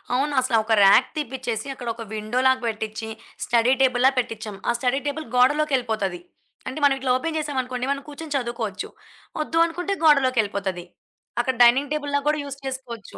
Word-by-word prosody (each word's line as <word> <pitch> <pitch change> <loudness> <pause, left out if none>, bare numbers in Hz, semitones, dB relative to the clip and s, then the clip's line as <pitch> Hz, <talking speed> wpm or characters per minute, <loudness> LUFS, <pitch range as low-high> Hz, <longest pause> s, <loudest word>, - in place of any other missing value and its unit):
అవునసల 260 -3 +1
ఒక 220 +1 0
ర్యాక్ 200 +6 +6
తీపిచ్చేసి, 260 -5 -3
అక్కడొక 235 -2 -5
విండో 215 +3 -2
లాగా 260 -1 +3
పెట్టిచ్చి, 220 0 -4 0.4
స్టడీ 235 +1 +3
టేబుల్‌లా 255 0 +4
పెట్టించాం. 220 -4 -3
ఆ - - +5
స్టడీ 255 +3 0
టేబుల్ 305 +2 -3
గోడలోకెళ్ళిపోతాది. 250 - +1 0.5
అంటే, 265 - -4
మనం 285 -1 +6
ఇట్లా 260 -1 0
ఓపెన్ 320 +4 -3
జేసామనుకోండి 260 -4 -2
మనం 280 - -2
కూర్చొని 295 0 -6
చదువుకోవచ్చు. 235 -5 -4 0.6
ఒద్దు 325 - -3
అనుకుంటే 355 +4 -3
గోడలోకెళ్ళిపోతది. 215 - +2 0.5
అక్కడ 255 +1 0
డైనింగ్ 265 +5 +4
టేబుల్ 290 -1 -3
లా 285 - +3
గూడా 305 0 +2
యూస్ 280 -1 -7
చేసుకోవచ్చు. 255 -5 -7
255 Hz, 150 wpm, -23 LUFS, 225-285 Hz, 0.6 s, ర్యాక్